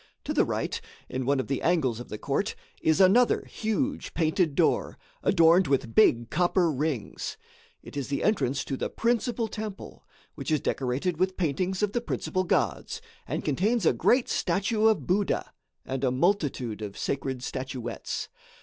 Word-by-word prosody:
To - - -2
the - - +3
right, - - -2 0.3
in 130 -1 -3
one 140 -1 +3
of 130 - -1
the 135 - -2
angles 140 -10 +1
of 120 - -9
the 105 - -5
court, - - -1 0.3
is 160 +3 +3
another 205 +6 +5
huge 260 +6 -2
painted 160 -2 +1
door, 165 - +1 0.2
adorned 170 0 +5
with 130 -4 0
big 120 - +4
copper 175 0 +2
rings. 145 -5 -3 0.5
It - - -11
is 140 -3 -3
the 140 -1 -2
entrance 140 - +1
to 135 - -2
the - - -3
principal 235 0 0
temple, 215 -2 -7 0.3
which - - -6
is 155 -1 +3
decorated 140 +8 -1
with 185 0 +1
paintings 185 +4 0
of 205 - +2
the 240 - -1
principal 185 -5 -2
gods, - - 0 0.3
and - - -3
contains 200 - +1
a - - +5
great 250 0 +3
statue 215 +3 +1
of 210 - +2
Buddha 195 +5 0 0.3
and 135 0 -3
a 130 - +3
multitude 130 - 0
of 100 -2 -6
sacred 135 -2 -2
statuettes. 130 -3 -4
165 Hz, 165 wpm, -27 LUFS, 135-200 Hz, 0.5 s, another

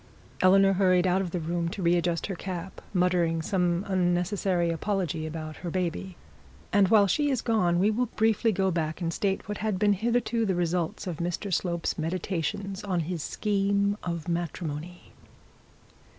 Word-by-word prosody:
Eleanor 195 +1 +6
hurried 185 -1 +3
out 185 +1 +2
of 185 - -3
the 180 - -3
room 170 +1 -2
to 185 +2 -5
re 170 +1 +4
adjust 170 -1 0
her 200 - -3
cap, 180 0 -6
muttering 180 -3 +2
some 175 +2 0
unnecessary 180 -1 +1
apology 165 -3 -2
about 155 -1 -6
her 175 - -5
baby. 180 +1 -3 0.6
And 200 -1 +5
while 205 0 +6
she 290 - +1
was 260 -4 0
gone, 185 -7 +2
we 200 +4 +3
will 245 +3 0
briefly 225 0 +2
go 190 -1 +1
back 160 -2 -2
and 165 -2 -2
state 195 +1 -1
what 210 - -4
had 215 -3 -1
been 205 +1 +3
hitherto 230 +2 0
the 195 -4 +1
results 175 -1 -1
of 175 -4 -4
Mr 175 +4 -3
Slope's 170 -2 -1
meditations 185 +4 -3
on 185 -4 0
his 165 0 -3
scheme 200 +2 0
of 170 -2 -4
matrimony. 170 0 -4
180 Hz, 165 wpm, -27 LUFS, 170-200 Hz, 0.6 s, Eleanor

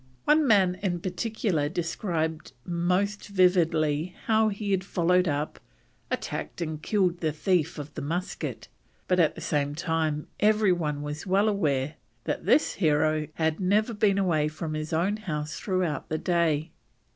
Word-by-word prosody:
One 300 -1 +4
man 190 -5 +4
in 180 -3 -1
particular 185 -4 -1
described 165 -2 -2
most 180 +4 0
vividly 175 -4 +2
how 220 0 +3
he 205 0 -3
had 190 -1 +1
followed 180 -1 +2
up, 145 0 -2 0.5
attacked - - -4
and 155 -3 -4
killed 185 -4 +1
the 160 -2 0
thief 165 +1 0
of 150 0 -7
the - - -5
musket, 175 +6 -4 0.4
but 180 0 +2
at 160 -3 +3
the - - -8
same 145 -1 -1
time 160 -2 -1
every 210 -1 +4
one 150 -5 -1
was 150 +5 -5
well 195 +3 +3
aware 150 -8 0 0.3
that - - -3
this 310 - +4
hero 155 -2 +1
had 160 -1 0
never 210 +5 +2
been 205 -2 +2
away 165 -6 +2
from 155 +1 -5
his 155 0 -4
own 180 +6 +1
house 155 -8 -4
throughout 185 -6 -1
the 155 - -1
day. 165 -2 +1
175 Hz, 155 wpm, -27 LUFS, 155-195 Hz, 0.5 s, One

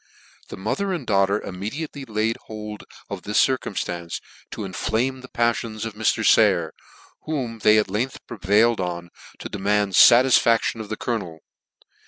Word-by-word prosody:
The - - -9
mother 190 - -2
and 175 - -4
daughter 100 0 +2
immediately 135 - -6
laid 110 0 -1
hold 105 -1 -8 0.2
of 100 -2 -6
this 105 +2 -3
circumftance 85 -9 -1 0.3
to - - -6
inflame 115 +7 -2
the 130 - -11
paffions 115 -2 -1
of 115 - -5
Mr. 110 +1 0
Sayer, 95 -7 +4 0.5
whom 130 -7 -3
they 105 +1 +5
at 105 - +2
length 110 +7 -3
prevailed 110 +2 +2
on 85 -1 -5 0.3
to - - -7
demand 100 0 0
fatisfaclion 120 0 +5
of 110 -2 -7
the 110 - -4
colonel. 90 -10 -4
110 Hz, 145 wpm, -23 LUFS, 100-120 Hz, 0.5 s, they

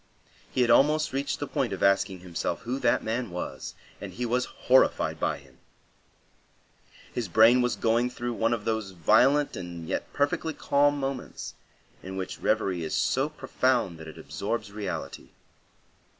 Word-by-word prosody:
He 130 - +1
had 120 -1 +4
almost 150 +3 +4
reached 140 +1 -1
the 145 - -2
point 130 -5 -1
of 95 - -4
asking 95 -1 +2
himself 85 -1 -3
who 125 +3 -3
that 120 -3 +2
man 115 +1 -2
was, 90 0 -6 0.3
and - - -6
he 125 - -4
was 125 +2 +1 0.2
horrified 130 +1 +3
by - - 0
him. - - -19 1.5
His 120 -4 -2
brain 110 +6 +6
was 125 0 +1
going 115 +2 +1
through 120 0 -4
one 115 0 +1
of 115 -3 -2
those 110 -4 -2
violent 135 - +4
and 85 -3 -7
yet - - -3
perfectly 145 +2 0
calm 145 0 +2
moments 135 -1 -5 0.5
in 95 +1 -7
which 95 -1 -5
reverie 95 -6 0
is 80 - -2
so 135 +3 +1
profound 125 - 0
that 80 - -9
it 80 - -10
absorbs 105 -1 -4
reality. 100 -2 -5
115 Hz, 160 wpm, -27 LUFS, 95-130 Hz, 1.5 s, brain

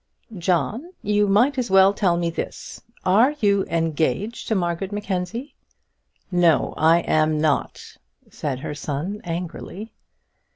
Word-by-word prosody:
"John, 190 - -1
you 210 0 +2
might 245 +8 +3
as 245 - -2
well 195 +1 +6
tell 185 -4 +1
me 170 -1 -1
this; - - -6 0.2
are 230 +10 +4
you 200 -3 +2
engaged 165 - -1
to 220 - +1
Margaret 175 +1 -2
Mackenzie?" 205 +5 -4 0.8
"No, 175 -4 +3
I 165 +2 +4
am 155 -1 +1
not," 150 -3 -1 0.3
said 135 -4 -4
her 150 - -4
son, 150 +8 -4
angrily. 180 +5 -6
180 Hz, 125 wpm, -23 LUFS, 165-205 Hz, 0.8 s, well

